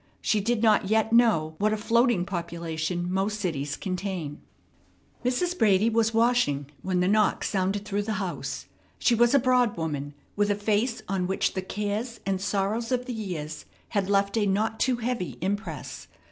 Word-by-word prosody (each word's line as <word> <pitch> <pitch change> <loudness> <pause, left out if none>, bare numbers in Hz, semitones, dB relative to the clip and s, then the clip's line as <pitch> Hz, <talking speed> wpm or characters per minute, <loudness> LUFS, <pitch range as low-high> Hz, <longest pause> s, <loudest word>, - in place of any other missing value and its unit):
She 210 - +1
did 230 +2 0
not 215 -3 +4
yet 220 +1 +2
know 215 -10 +4
what 210 +1 +2
a - - 0
floating 230 -3 +2
population 170 -1 -3
most 200 +3 0
cities 145 -7 -2
contain. 185 -6 -4 0.8
Mrs. 345 +9 0
Brady 215 - +3
was 225 0 +2
washing 225 - +2
when 185 -1 0
the 180 - +2
knock 210 +1 +2
sounded 195 +1 -1
through 205 0 -1
the 215 +1 -2
house. 170 -9 -4 0.3
She 245 - +3
was 240 +3 +4
a - - +7
broad 250 -4 +2
woman, 145 -3 -3 0.2
with 205 0 +2
a 205 - +2
face 215 +3 0
on 185 -2 -1
which 190 - 0
the 190 - -2
cares 210 +5 -3
and 190 -1 -1
sorrows 205 +4 -1
of 250 -1 0
the 250 - -4
years 170 -9 -5 0.2
had 200 -3 -1
left 200 0 +2
a 210 -2 +2
not 215 +3 0
too 260 -1 +2
heavy 235 -5 -3
impress. 205 +4 -4
205 Hz, 175 wpm, -27 LUFS, 180-225 Hz, 0.8 s, a